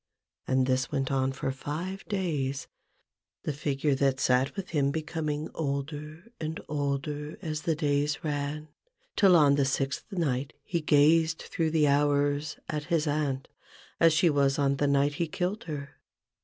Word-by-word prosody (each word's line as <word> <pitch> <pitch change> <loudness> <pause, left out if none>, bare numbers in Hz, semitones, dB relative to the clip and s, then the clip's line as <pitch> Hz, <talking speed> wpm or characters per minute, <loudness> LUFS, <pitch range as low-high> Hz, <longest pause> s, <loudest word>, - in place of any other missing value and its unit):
And 130 0 +3
this 130 0 0
went 135 -2 -1
on 135 -1 +1
for 135 0 -3
five 165 +8 -5
days; 145 -9 -2 0.8
the 150 - -2
figure 140 0 0
that 135 -1 +1
sat 130 +2 +2
with 195 -2 -5
him 145 -4 +2
becoming 155 0 -2
older 150 +6 -4
and 160 0 -4
older 145 +1 -2
as 155 -2 -3
the 160 +1 0
days 145 -1 0
ran, 150 0 -3 0.5
till 190 -3 +6
on 145 -3 +5
the 140 - +3
sixth 135 - -2
night 145 -7 -1
he 170 -5 -2
gazed 155 +2 +4
through 165 -2 -1
the 155 -2 +3
hours 145 +1 +2
at 150 -1 -3
his 165 -1 +1
aunt 145 -3 -1 0.5
as 165 -1 +6
she 175 +3 +4
was 140 -3 +3
on 140 -1 +2
the 145 - +1
night 140 +1 +3
he 170 - +1
killed 185 +6 -2
her. 140 -3 -5
145 Hz, 155 wpm, -28 LUFS, 140-160 Hz, 0.8 s, till